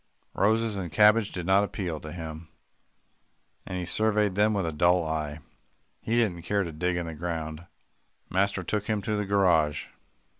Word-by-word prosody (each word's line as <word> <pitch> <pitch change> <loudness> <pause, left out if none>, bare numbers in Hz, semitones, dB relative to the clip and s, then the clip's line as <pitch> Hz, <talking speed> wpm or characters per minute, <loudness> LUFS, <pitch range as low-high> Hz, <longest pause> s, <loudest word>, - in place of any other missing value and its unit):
Roses 110 +1 +1
and 90 -4 -4
cabbages 105 +5 +5
did 90 -2 -5
not 95 +2 +4
appeal 90 -6 -3
to 75 - -9
him, 80 -2 -7 1.2
and 90 - -4
he 90 - -3
surveyed 105 +1 +1
them 105 +3 +3
with 100 -3 0
a 80 - -1
dull 85 +2 +3
eye. 80 -1 -3 0.6
He 115 - -1
didn't 105 -8 +1
care 100 +4 0
to 85 - -5
dig 85 +3 -1
in 85 - -2
the 80 - -6
ground. 80 0 -5 0.6
Master 95 0 0
took 105 +4 -2
him 105 -2 -1
to 110 - -1
the 105 0 -1
garage. 85 -7 +2
90 Hz, 175 wpm, -27 LUFS, 80-105 Hz, 1.2 s, cabbages